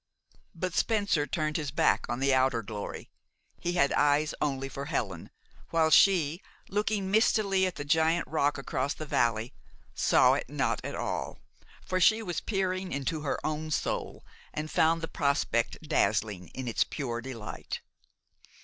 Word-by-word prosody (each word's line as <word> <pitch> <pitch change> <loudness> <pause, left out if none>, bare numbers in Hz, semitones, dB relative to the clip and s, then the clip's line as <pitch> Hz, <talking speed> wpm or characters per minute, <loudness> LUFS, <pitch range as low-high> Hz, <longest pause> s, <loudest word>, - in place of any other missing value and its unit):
But 180 +1 -3
Spencer 200 -10 +1
turned 155 -1 -1
his 150 -3 -3
back - - +2
on 120 - -2
the 135 0 +2
outer 130 -3 +2
glory. 105 -1 -7 0.5
He 175 - -2
had 140 -5 +3
eyes 145 +1 +3
only 135 -2 -1
for 140 +1 -6
Helen, 105 - -3 0.4
while 160 -1 +2
she, 170 -3 +5 0.3
looking 205 -1 -1
mistily 200 -3 +3
at 185 - -5
the 145 - -5
giant 160 +3 +2
rock 145 -2 +1
across 135 0 -2
the 155 - -6
valley, 115 -4 0 0.4
saw - - +4
it - - -2
not - - -1
at - - -4
all, - - -3 0.5
for 185 - 0
she 220 +5 +4
was 175 -5 -3
peering 190 -2 -1
into 140 +3 -2
her 145 - -1
own 155 0 -2
soul, 155 - -2 0.3
and 155 +1 -4
found 165 +1 +3
the 165 - -3
prospect 140 -7 0
dazzling 100 -6 0
in 130 +7 -7
its 115 - +2
pure 120 -5 -4
delight. 120 -4 -6
150 Hz, 155 wpm, -29 LUFS, 130-175 Hz, 0.5 s, she